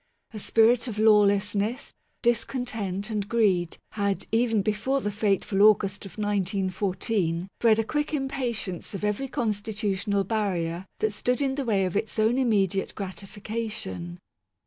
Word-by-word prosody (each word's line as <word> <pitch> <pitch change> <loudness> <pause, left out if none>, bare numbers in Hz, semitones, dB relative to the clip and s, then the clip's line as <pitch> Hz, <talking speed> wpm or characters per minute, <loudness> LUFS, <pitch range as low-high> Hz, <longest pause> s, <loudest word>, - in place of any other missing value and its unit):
A 215 - -6
spirit 230 +3 +3
of 220 -3 -5
lawlessness, 210 +2 +3 0.3
discontent, 225 -4 -1
and 205 -1 -2
greed 195 -7 +2
had 200 -2 -1
(even 225 -2 +2
before 215 +7 0
the 210 -5 -2
fateful 200 -1 +1
August 200 -2 +4
of 195 - -15
1914) 190 -2 -1
bred 225 -2 +5
a 225 - +2
quick 295 +6 -2
im 275 -3 -1
patience 235 -9 -3
of 195 - -6
every 210 +6 -1
constitutional 205 -3 -1
barrier 185 -4 -2
that 215 -1 +1
stood 250 +5 0
in 275 -2 +1
the 275 0 -3
way 200 -5 +2
of 185 - -3
its 215 +2 -2
own 220 +4 +3
immediate 200 -6 +1
gratification. 200 - -5
210 Hz, 140 wpm, -26 LUFS, 195-230 Hz, 0.3 s, bred